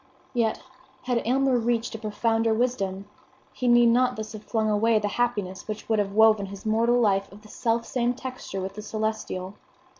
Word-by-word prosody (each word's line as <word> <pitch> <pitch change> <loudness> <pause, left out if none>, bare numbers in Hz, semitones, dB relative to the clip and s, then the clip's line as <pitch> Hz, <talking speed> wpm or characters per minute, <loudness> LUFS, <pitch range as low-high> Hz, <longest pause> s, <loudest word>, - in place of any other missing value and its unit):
Yet, 230 -3 0 0.4
had 245 -2 0
Alymer 265 0 +3
reached 235 0 -1
a 225 - -6
profounder 225 +1 0
wisdom, 200 -5 -1 0.5
he 250 - -2
need 240 0 +6
not 250 +2 +3
thus 215 0 -6
have 215 0 -9
flung 220 -2 -1
away 215 +2 +3
the 210 -1 0
happiness 205 -5 -2
which 215 -1 -6
would 220 -1 +2
have 195 -1 -1
woven 215 -2 +5
his 195 +1 -10
mortal 230 +3 +2
life 195 -4 +1
of 205 +1 -14
the 215 - -15
selfsame 235 +1 0
texture 255 -6 -6
with 190 +1 -5
the 210 - -7
celestial. 215 -4 -3
220 Hz, 180 wpm, -26 LUFS, 210-240 Hz, 0.5 s, need